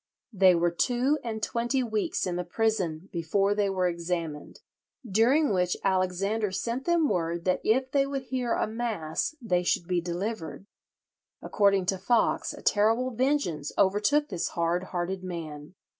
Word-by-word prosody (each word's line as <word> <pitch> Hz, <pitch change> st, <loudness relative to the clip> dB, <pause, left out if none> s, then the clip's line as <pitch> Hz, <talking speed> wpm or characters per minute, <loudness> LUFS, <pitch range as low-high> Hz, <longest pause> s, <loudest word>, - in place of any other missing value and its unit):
They 190 Hz, -2 st, +5 dB
were 170 Hz, 0 st, +2 dB
two 250 Hz, -, +1 dB
and 220 Hz, -2 st, -4 dB
twenty 240 Hz, +3 st, 0 dB
weeks 220 Hz, -3 st, -1 dB
in 180 Hz, -2 st, -2 dB
the 180 Hz, -, -2 dB
prison 185 Hz, -4 st, -1 dB
before 195 Hz, +4 st, +1 dB
they 205 Hz, -1 st, +1 dB
were 185 Hz, -1 st, +1 dB
examined, 170 Hz, -3 st, -4 dB, 0.5 s
during 235 Hz, +7 st, +3 dB
which 180 Hz, -1 st, +1 dB
Alexander 195 Hz, +3 st, 0 dB
sent 235 Hz, +7 st, -3 dB
them 340 Hz, -3 st, +3 dB
word 170 Hz, -3 st, -1 dB
that 185 Hz, -1 st, +1 dB
if 260 Hz, +4 st, +1 dB
they 275 Hz, -1 st, +2 dB
would 275 Hz, -1 st, -3 dB
hear 255 Hz, -2 st, -2 dB
a -, -, +1 dB
mass 220 Hz, -, -3 dB
they 180 Hz, -8 st, 0 dB
should 175 Hz, -1 st, 0 dB
be 180 Hz, -1 st, +1 dB
delivered. 175 Hz, 0 st, -4 dB, 0.7 s
According 200 Hz, -2 st, +2 dB
to 190 Hz, +1 st, -1 dB
Foxe 225 Hz, +4 st, +1 dB
a -, -, -11 dB
terrible 225 Hz, +5 st, +2 dB
vengeance 245 Hz, -, 0 dB
overtook 210 Hz, +10 st, +2 dB
this 180 Hz, -5 st, -2 dB
hard 170 Hz, +2 st, -1 dB
hearted 185 Hz, +1 st, -3 dB
man. 165 Hz, -2 st, -7 dB
195 Hz, 155 wpm, -27 LUFS, 175-235 Hz, 0.7 s, They